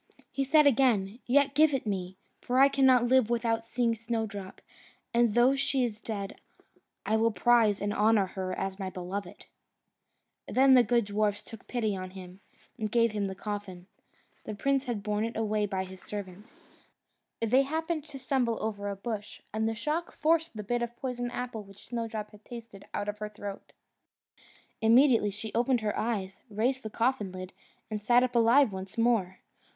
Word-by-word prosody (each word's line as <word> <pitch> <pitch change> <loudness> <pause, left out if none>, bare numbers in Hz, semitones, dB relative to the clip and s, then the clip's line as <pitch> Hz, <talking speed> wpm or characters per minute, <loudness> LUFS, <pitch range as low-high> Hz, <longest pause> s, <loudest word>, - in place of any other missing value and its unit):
He 275 - -1
said 300 +2 +5
again, 230 -6 +3
"Yet 280 +2 +3
give 300 0 +4
it 260 - -3
me; 190 -3 -3 0.2
for 250 - -1
I 275 +1 +7
cannot 260 -3 +4
live 255 -2 +4
without 230 -1 0
seeing 235 0 0
Snowdrop, 220 -4 -4 0.5
and 235 -2 +3
though 250 +3 +5
she 270 -1 +1
is 220 -3 -3
dead, 200 -3 -5 0.6
I 220 - +1
will 225 +1 +3
prize 225 -2 +3
and 205 0 -1
honour 210 -1 +3
her 185 0 -5
as 195 0 -3
my 190 -1 -3
beloved." 185 +1 -6 1.0
Then 265 +1 +5
the 255 - +8
good 235 -2 +2
dwarfs 205 0 0
took 225 -2 -12
pity 220 -5 -1
on 185 -1 -5
him, 185 0 -11 0.4
and 215 -1 -2
gave 230 -1 +3
him 205 -2 -1
the 190 - -5
coffin. 200 -3 -6 0.6
The 215 - -5
prince 275 +5 +1
had 240 -3 -2
it 200 - -9
borne 210 +2 -1
away 215 -1 0
by 190 -1 -2
his 190 -1 -11
servants. 205 +1 -8 0.8
They 230 +4 +4
happened 315 +2 -2
to 290 -3 -9
stumble 255 -3 0
over 205 -2 -3
a 200 - -3
bush, 210 0 -6
and 220 +1 0
the 225 - -3
shock 305 +9 -2
forced 325 -3 +1
the 210 - -4
bit 240 +4 -1
of 240 0 -4
poisoned 245 -2 -3
apple 245 -3 -4
which 195 -1 -15
Snowdrop 225 -3 -4
had 210 0 -17
tasted 230 -5 -10
out 205 - -2
of 210 0 -4
her 210 0 -4
throat. 205 -1 -8 1.1
Immediately 230 -1 +5
she 210 +2 -7
opened 245 +1 +2
her 210 -1 -1
eyes, 200 -4 -3
raised 240 +5 0
the 220 - -6
coffin 225 -3 0
lid, 185 0 -8 0.4
and 210 -1 -3
sat 240 +3 +4
up 250 -1 -1
alive 235 +2 +5
once 190 +1 -7
more. 225 -6 +2
225 Hz, 180 wpm, -29 LUFS, 205-245 Hz, 1.1 s, the